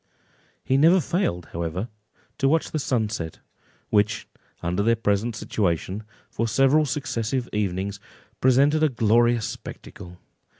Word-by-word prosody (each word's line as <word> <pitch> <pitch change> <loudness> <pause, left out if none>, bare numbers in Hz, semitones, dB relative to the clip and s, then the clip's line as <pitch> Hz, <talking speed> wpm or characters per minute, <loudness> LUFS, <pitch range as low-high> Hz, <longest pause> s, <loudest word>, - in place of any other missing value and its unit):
He 130 - +2
never 165 +6 +6
failed, 150 - -1
however, 85 +5 -3 0.5
to 135 - +3
watch 160 +2 +1
the 155 - -1
sunset, 110 - -2 0.5
which, 105 +1 +1 0.4
under 90 +3 0
their 115 +3 +3
present 110 +1 0
situation, 95 -1 -1 0.3
for 115 - -1
several 135 +6 +3
successive 125 -2 -2
evenings, 100 -1 -2 0.4
presented 140 +4 +4
a 155 - +4
glorious 120 -1 +3
spectacle. 90 0 -9
115 Hz, 120 wpm, -24 LUFS, 100-135 Hz, 0.5 s, never